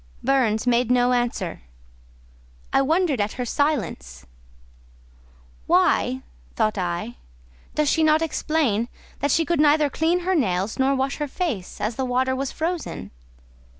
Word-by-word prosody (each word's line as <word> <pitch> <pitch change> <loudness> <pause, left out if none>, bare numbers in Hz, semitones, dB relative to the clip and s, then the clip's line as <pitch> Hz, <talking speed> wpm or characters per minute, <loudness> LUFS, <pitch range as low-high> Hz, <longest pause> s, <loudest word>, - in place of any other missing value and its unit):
Burns 245 -5 +2
made 240 -1 +2
no 250 0 +3
answer: 240 - -2 1.1
I - - +5
wondered 310 - +1
at 205 +1 -1
her 250 - -4
silence. 180 - -2 1.4
"Why," 130 +1 +2 0.3
thought 215 - +1
I, 175 -8 -3 0.6
"does 300 -1 +1
she 320 - +2
not 310 +1 +4
explain 290 -8 0 0.3
that 285 - 0
she 325 +4 +2
could 340 0 0
neither 300 -1 +4
clean 335 +5 +1
her 370 +2 0
nails 200 - 0
nor 270 +1 +3
wash 270 +1 -1
her 295 - -2
face, 270 - -4
as 220 +2 -2
the 265 - -1
water 260 +1 +1
was 270 0 -3
frozen?" 335 0 -4
265 Hz, 140 wpm, -23 LUFS, 220-305 Hz, 1.4 s, I